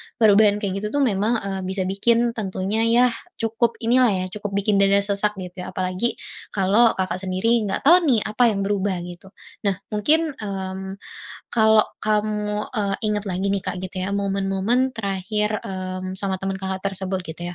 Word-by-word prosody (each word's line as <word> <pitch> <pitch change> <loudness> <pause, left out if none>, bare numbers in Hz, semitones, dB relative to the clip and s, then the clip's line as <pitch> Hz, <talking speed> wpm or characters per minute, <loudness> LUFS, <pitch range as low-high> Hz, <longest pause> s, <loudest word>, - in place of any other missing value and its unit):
Perubahan 210 -1 +4
kayak 195 0 -1
gitu 210 - -3
tuh 285 - +3
memang, 215 0 +1
eee, 195 -1 -3
bisa 190 0 -2
bikin 230 +5 +2
tentunya 210 0 -1
ya, 245 +1 +4 0.2
cukup 225 +1 0
inilah 250 +2 +4
ya, 185 - -2
cukup 205 -1 -5
bikin 200 0 +2
dada 200 0 +4
sesak 205 +1 +1
gitu 180 -1 -8
ya - - -7
apalagi, 185 +5 0 0.4
kalau 205 +5 +4
Kakak 185 -1 -2
sendiri 205 +4 +1
nggak 195 - -2
tahu 345 +6 +7
nih 235 -5 +3
apa 215 +4 0
yang 200 -3 0
berubah 200 -1 0
gitu. 175 +2 -10 0.4
Nah, 195 - +2 0.2
mungkin, 305 +9 +2
mmm, 190 -1 -5 0.6
kalau 220 -1 +5 0.2
kamu, 210 0 -1
e 210 - 0 0.2
ingat 210 -1 0
lagi 190 -1 -3
nih 195 - -2
Kak - - -3
gitu 185 0 -5
ya, 195 - -2
momen-momen 200 +5 0
terakhir, 210 +1 -1
mmm, 185 0 -5
sama 190 -1 -3
teman 195 0 -2
Kakak 190 0 -4
tersebut 190 -1 -3
gitu 175 +1 -7
200 Hz, 170 wpm, -22 LUFS, 190-215 Hz, 0.6 s, tahu